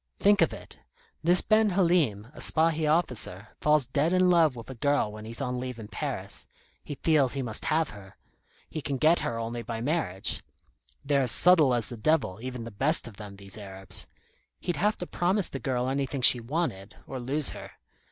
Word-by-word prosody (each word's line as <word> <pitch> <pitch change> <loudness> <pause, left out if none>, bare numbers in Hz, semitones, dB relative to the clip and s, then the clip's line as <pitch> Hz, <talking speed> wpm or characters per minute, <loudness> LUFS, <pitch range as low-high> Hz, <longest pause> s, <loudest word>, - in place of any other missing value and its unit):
Think 205 +1 +4
of - - +4
it. - - -11 0.4
This 175 +2 +6
Ben 215 0 +3
Halim, 170 - +1
a - - -12
Spahi 160 -1 +2
officer, 120 - -1
falls 150 -2 +3
dead 145 +7 0
in 185 0 +4
love 160 -6 +4
with 115 - -9
a - - -6
girl 140 -2 0
when 110 0 -9
he's 115 +4 -5
on 125 -2 -2
leave 125 -1 -5
in 110 -2 -9
Paris. - - -4 0.4
He 145 - -6
feels 150 -6 +3
he 135 -1 -2
must 110 -3 -1
have 160 -1 +1
her. 95 -2 -14 0.5
He 155 - -6
can 140 -1 -3
get 160 +6 +4
her 115 - -3
only 115 +1 -4
by 115 0 -5
marriage. 120 - -1 0.6
They're 140 -1 +2
as 125 -3 +1
subtle 160 -8 +5
as 115 -3 0
the 120 - -7
devil, 125 -7 0
even 125 -1 -6
the 115 - -8
best 135 +9 -1
of 110 -4 -12
them, 105 -2 -9
these 100 +2 -8
Arabs. 95 -1 -4 0.5
He'd 175 - -3
have 210 +1 +1
to 180 - -5
promise 185 +3 0
the 135 - -6
girl 125 -1 -1
anything 135 0 -2
she 125 0 +9
wanted, 115 - -3
or 130 - -6
lose 135 +4 -1
her. - - -10
135 Hz, 200 wpm, -27 LUFS, 115-160 Hz, 0.6 s, she